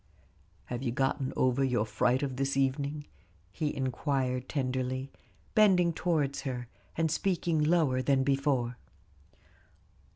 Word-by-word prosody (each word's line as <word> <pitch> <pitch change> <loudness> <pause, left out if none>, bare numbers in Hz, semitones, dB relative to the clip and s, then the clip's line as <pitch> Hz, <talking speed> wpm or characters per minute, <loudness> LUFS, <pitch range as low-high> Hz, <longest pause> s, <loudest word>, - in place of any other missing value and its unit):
"Have 120 0 -5
you 125 -3 -1
gotten 135 +1 0
over 130 +1 +2
your 125 -5 +1
fright 120 +5 +1
of 135 -2 -3
this 135 0 0
evening?" 140 +2 0 0.5
he 150 +6 -2
inquired 130 -1 -1
tenderly, 130 -1 -2 0.4
bending 185 -6 +5
towards 150 -5 0
her, 125 -3 -4 0.3
and 160 -1 +1
speaking 170 -2 0
lower 150 -5 +3
than 135 0 +2
before. 135 -3 0
135 Hz, 120 wpm, -30 LUFS, 130-150 Hz, 0.5 s, bending